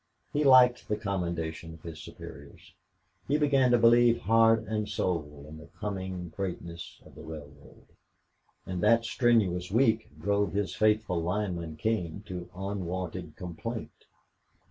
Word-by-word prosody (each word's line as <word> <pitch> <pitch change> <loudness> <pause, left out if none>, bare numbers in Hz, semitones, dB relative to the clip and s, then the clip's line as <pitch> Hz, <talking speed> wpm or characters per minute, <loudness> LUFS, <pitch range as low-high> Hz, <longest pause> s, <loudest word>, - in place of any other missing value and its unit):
He 150 - +1
liked 125 -3 +6
the 105 - -1
commendation 85 -5 -3
of 80 - -18
his 80 -2 -8
superiors. 70 +1 -12 0.5
He 145 - +2
began 140 -4 +3
to 120 - +5
believe 120 0 +5
heart 115 +1 +4
and 105 -1 -3
soul 75 -5 -2
in 80 +1 -10
the 80 - -12
coming 95 -4 -4
greatness 85 -1 -6
of - - -15
the - - -12
railroad. 75 -2 -11 0.8
And 90 -1 -4
that 115 +3 +4
strenuous 110 -7 +2
week 110 0 +2
drove 100 0 0
his 100 -1 -1
faithful 105 -5 +2
lineman, 85 -3 -2
King, 100 0 -2
to 90 -3 -7
unwonted 90 -3 -4
complaint. 100 +6 -7
95 Hz, 135 wpm, -29 LUFS, 85-115 Hz, 0.8 s, liked